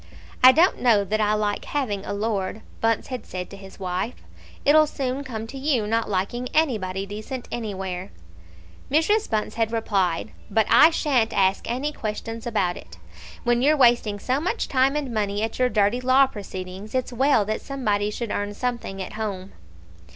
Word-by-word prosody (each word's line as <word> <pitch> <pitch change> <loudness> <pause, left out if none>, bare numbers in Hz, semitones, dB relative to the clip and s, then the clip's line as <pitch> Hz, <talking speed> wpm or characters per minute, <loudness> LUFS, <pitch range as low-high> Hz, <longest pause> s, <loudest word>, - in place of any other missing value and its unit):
"I 255 - +11
don't 335 +7 +3
know 225 -5 +4
that 215 +2 -1
I 210 0 +2
like 210 -1 -1
having 220 -9 -2
a - - -4
Lord," 205 0 -2 0.2
Bunce 225 +2 +1
had 255 -3 -5
said 180 -1 -6
to - - -8
his 195 0 -13
wife. 185 +5 -2 0.5
"It'll 305 +1 +6
soon 270 -1 -3
come 225 -5 -5
to 270 +4 -8
you 265 -6 +1
not 225 +1 0
liking 210 +6 -2
anybody 200 -11 +1
decent 215 +5 -6
anywhere," 190 -5 -4 0.8
Mrs. 365 +9 +2
Bunce 215 -1 -1
had 225 -1 0
replied; 200 -5 0 0.2
"but 220 +1 +2
I - - +8
shan't 270 -8 +1
ask 190 +2 +1
any 260 +5 -1
questions 225 -2 -5
about 195 -6 0
it. 85 -1 -13 0.5
When 240 0 +2
you're 300 +3 +4
wasting 235 -5 +4
so 255 +6 -1
much 370 +8 -1
time 270 +1 +2
and 280 -5 -2
money 205 -1 -1
at 225 - -3
your 250 0 +3
dirty 215 +2 +2
law 260 +2 +5
proceedings, 195 -2 -7
it's 255 -1 -1
well 260 -3 +3
that 215 +1 -2
somebody 210 -7 -1
should 225 +1 -4
earn 205 0 -2
something 240 -6 -3
at - - -9
home." 200 -3 -4
225 Hz, 175 wpm, -24 LUFS, 205-255 Hz, 0.8 s, I